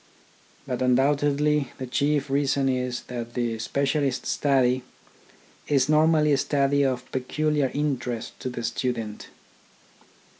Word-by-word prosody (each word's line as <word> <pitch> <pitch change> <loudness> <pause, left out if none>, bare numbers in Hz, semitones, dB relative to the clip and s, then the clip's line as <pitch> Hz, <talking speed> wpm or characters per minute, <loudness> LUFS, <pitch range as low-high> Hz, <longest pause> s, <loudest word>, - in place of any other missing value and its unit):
But 130 -2 -3
undoubtedly 145 +2 +2
the 130 - -5
chief 140 +2 0
reason 140 0 +1
is 125 -1 -1
that 120 -1 -7
the 120 -2 -1
specialist 140 +2 -1
study 130 -3 +2 0.9
is 140 -1 +2
normally 155 0 +4
a - - +3
study 140 0 +2
of 130 -2 0
peculiar 145 +2 0
interest 130 -5 -3
to 130 - -4
the 120 -1 -6
student. 115 -4 -3
135 Hz, 115 wpm, -25 LUFS, 125-145 Hz, 0.9 s, normally